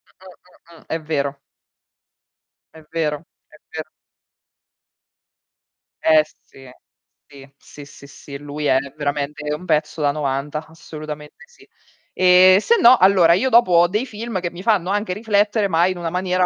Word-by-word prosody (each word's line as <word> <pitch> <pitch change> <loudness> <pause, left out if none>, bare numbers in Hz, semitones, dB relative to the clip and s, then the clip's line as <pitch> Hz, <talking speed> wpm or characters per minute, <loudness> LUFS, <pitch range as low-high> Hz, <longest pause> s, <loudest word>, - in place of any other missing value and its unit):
Mh, 190 - -21 0.5
mh, - - -16
mh, - - -17
mh, - - -23
è 160 0 -4
vero. 140 -3 -3 1.4
È 160 - -14
vero, 155 -3 -1 0.3
è - - -20
vero. 155 0 -7 2.1
Eh 155 -1 +5 0.2
sì, 135 -1 -16 0.6
sì, 140 -1 -16
sì, 145 +1 -14
sì, 140 0 -15
sì 140 0 -11
lui 145 +1 -7
è 130 - +3 0.2
veramente 150 0 -3
un 175 +4 -7
pezzo 155 -1 -1
da 145 - +2
novanta, 145 +1 -4
assolutamente 155 - -10
sì. 485 - -22 0.5
E, 185 0 +6
sennò, 255 - +5
allora 185 -4 +5
io 210 +10 +1
dopo 230 -6 +4
ho 170 +1 +5
dei 210 +7 -2
film 225 -4 -5
che 175 -1 -4
mi 175 - -10
fanno 200 -5 +1
anche 205 -1 -1
riflettere, 210 0 0
ma 170 0 +2
in 185 - -3
una 170 -1 -4
maniera 180 +1 0
165 Hz, 155 wpm, -20 LUFS, 150-185 Hz, 2.1 s, E